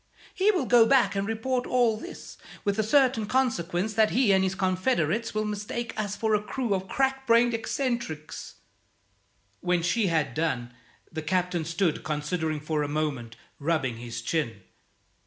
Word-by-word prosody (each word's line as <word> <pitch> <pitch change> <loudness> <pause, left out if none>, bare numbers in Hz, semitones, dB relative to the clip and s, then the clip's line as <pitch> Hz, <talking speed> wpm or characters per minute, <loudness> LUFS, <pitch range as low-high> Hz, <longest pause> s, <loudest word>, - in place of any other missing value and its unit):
He 390 +3 +2
will 365 -10 +2
go 235 -2 +6
back 265 -5 +4
and 195 0 -1
report 245 +3 -1
all 240 -3 +3
this, 345 +12 -9 0.3
with 200 0 0
the - - +3
certain 245 -1 +3
consequence 210 -6 0
that 220 0 +4
he 245 -3 +3
and 190 0 +4
his 190 0 0
confederates 185 - 0
will 215 0 0
mistake 210 +3 -4
us 205 -2 -2
for 220 +1 0
a 210 - +3
crew 235 0 -2
of 190 0 -2
crack 270 +2 0
brained 235 +1 +5
eccentrics." 225 - -3 1.0
When 175 -1 0
she 195 +4 +2
had 160 -3 0
done, 125 -7 -2 0.4
the 160 - -4
Captain 175 0 0
stood 165 0 0
considering 155 +1 -2
for 155 0 -1
a 145 - -1
moment, 145 -6 -2 0.2
rubbing 140 -6 0
his 120 0 -6
chin. 115 - -2
195 Hz, 160 wpm, -27 LUFS, 160-235 Hz, 1.0 s, go